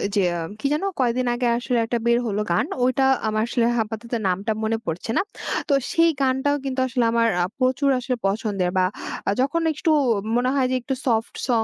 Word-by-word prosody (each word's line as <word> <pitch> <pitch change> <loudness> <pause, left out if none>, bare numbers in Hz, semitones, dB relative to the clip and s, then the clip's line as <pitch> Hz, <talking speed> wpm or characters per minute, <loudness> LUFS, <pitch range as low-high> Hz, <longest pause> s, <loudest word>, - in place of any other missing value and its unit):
জেয়াম 175 -4 0
কি - - -8
যেন 300 - -1 0.2
কয়েকদিন 250 0 +1
আগে 240 0 0
আসলে 245 0 -1
একটা 235 +1 -1
বের 235 0 +4
হলো 210 -1 -1
গান 170 - +2 0.2
ওইটা, 255 +2 +2 0.2
আমার 215 0 0
আসলে 240 -1 +1
আপাতত 225 +1 -3 0.2
নামটা 195 +4 -1
মনে 225 +1 0
পড়ছে 170 +7 -3
না। - - +4 0.5
তো - - +4 0.2
সেই 330 0 +4
গানটাও 265 +2 +2
কিন্তু 265 -1 -2
আসলে 250 -1 0
আমার 230 0 +3 0.2
আ - - +2
প্রচুর 260 +2 +2
আসলে 250 0 -2
পছন্দের, 195 -2 -1
বা 185 - +4 0.6
যখন 290 +6 +1
একটু 310 +2 0 0.4
মনে 250 +1 +2
হয় 260 -2 +2
যে - - +1
একটু 265 - -3
সফট 225 -3 0
সং 230 -3 +2
240 Hz, 190 wpm, -23 LUFS, 215-260 Hz, 0.6 s, বের